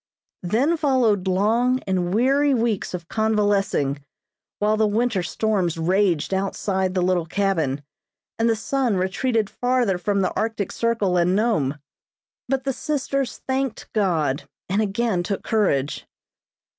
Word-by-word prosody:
Then 250 - +1
followed 245 - +2
long 225 +7 +2
and 180 -2 0
weary 270 +6 +3
weeks 225 -6 -1
of 170 -2 -8
convalescing, 205 -10 +1 0.5
while 210 +1 +2
the 215 0 +2
winter 220 -1 +1
storms 180 -1 -1
raged 180 0 +1
outside 190 -1 -1
the 180 - +2
little 180 -2 +1
cabin, 165 -7 0 0.6
and 230 +1 +3
the 225 - +3
sun 240 0 0
retreated 215 +4 0
farther 245 -6 0
from 200 +2 0
the 185 - 0
Arctic 220 -3 -2
Circle 225 -6 0
and 175 +2 +2
Nome, 180 - +1 0.7
but 265 -1 0
the 270 0 -1
sisters 275 -1 -2
thanked 265 -2 -2
God, 160 -10 0 0.2
and 195 +4 +1
again 210 -2 0
took 195 +2 -3
courage. 150 -11 0
205 Hz, 130 wpm, -23 LUFS, 180-235 Hz, 0.7 s, weary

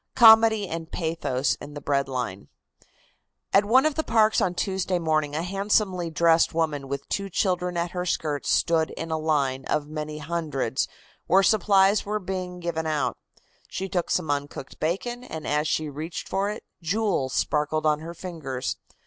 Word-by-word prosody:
COMEDY 220 -3 +7
AND 165 -1 -6
PATHOS 145 -6 -1
IN 145 +1 -9
THE - - -4
BREAD 140 -1 0
LINE. 125 -7 -4 1.1
At 200 +1 +5
one 255 +7 +5
of 310 - +2
the 315 - -1
parks 220 -3 +3
on 180 -1 0
Tuesday 190 -1 -1
morning 155 -3 0
a 160 - -1
handsomely 195 -2 0
dressed 165 +1 +3
woman 150 -4 -1
with 140 +1 -5
two 200 0 -2
children 180 -1 0
at 170 0 -1
her 180 0 -3
skirts 150 -4 -1
stood 165 -2 +2
in 165 0 -5
a 160 - +1
line 140 -4 0
of 150 - 0
many 155 0 -5
hundreds 150 -5 -2 0.4
where 195 +3 +5
supplies 200 0 +4
were 210 +1 -2
being 185 -2 -5
given 165 -2 -2
out. 145 -6 0 0.5
She 190 - -4
took 180 -3 -2
some 160 -5 0
uncooked 145 -1 -5
bacon, 240 +10 -2
and 160 -10 -7
as 150 +1 0
she 155 - 0
reached 155 +4 -6
for 195 +1 0
it 210 - -6 0.2
jewels 175 -7 0
sparkled 155 +1 0
on 150 -1 +3
her 165 +2 -8
fingers. 155 -8 -4
165 Hz, 170 wpm, -25 LUFS, 150-190 Hz, 1.1 s, COMEDY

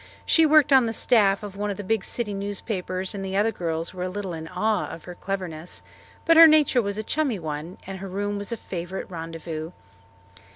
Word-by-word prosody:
She 325 -1 +5
worked 300 -2 +5
on 260 -3 +6
the 225 - -2
staff 210 -4 +3
of 200 -2 -7
one 205 +1 -2
of 200 - -3
the 205 - -5
big 215 0 0
city 225 -4 -3
newspapers 195 -2 -3
and 195 -1 -5
the 190 0 -2
other 215 +2 +3
girls 165 -4 -3
were 180 - -7
a 185 - -1
little 190 -1 -4
in 160 0 -6
awe 210 +5 0
of 165 - -9
her 180 - -8
cleverness, 180 -3 -5 0.4
but 330 0 +5
her 330 0 +11
nature 300 -5 +4
was 200 -1 -3
a 215 - -2
"chummy" 280 -2 0
one 160 +1 -5
and 190 0 -6
her 195 - -6
room 205 +2 -2
was 200 +3 -6
a 235 - -2
favourite 185 -1 -6
rendezvous. 165 -1 -6
195 Hz, 215 wpm, -25 LUFS, 180-220 Hz, 0.4 s, her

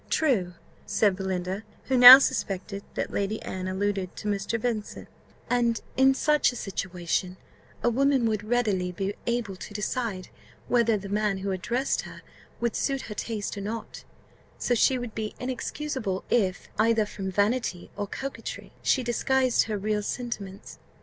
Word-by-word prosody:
"True," 200 - +1 0.3
said 205 -3 +2
Belinda 190 0 -3 0.2
(who 265 - 0
now 250 +1 +13
suspected 200 -6 -2
that - - -2
Lady 200 +2 -1
Anne 185 0 -4
alluded 190 -1 -2
to 210 - -6
Mr. 205 +3 -1
Vincent); 225 -3 -3 0.4
"and 235 -2 +1 0.2
in 265 0 +5
such 300 0 +3
a - - -10
situation 185 -3 -3 0.5
a 240 - +4
woman 270 0 +2
would 215 -2 0
readily 210 -6 0
be 195 +3 -3
able 235 -5 -1
to 205 - -9
decide 210 -3 -3 0.4
whether 235 -3 +3
the 200 0 -7
man 205 0 0
who 195 +1 -3
addressed 240 +8 -1
her - - -11 0.4
would 235 -2 -1
suit 275 -1 0
her 210 - -7
taste 210 0 -4
or - - -5
not; 215 +2 -6 0.5
so 245 - 0
she 255 +3 +3
would 245 -3 -6
be 215 -1 -4
inexcusable 255 -4 -3
if, 195 -6 +1
either 220 0 +3
from 195 -2 -5
vanity 205 -2 0
or 205 0 -3
coquetry, 275 +6 -6
she 260 - +2
disguised 255 +1 +2
her 215 -2 -2
real 210 +1 -1
sentiments." 205 -3 -6
215 Hz, 155 wpm, -27 LUFS, 195-245 Hz, 0.5 s, now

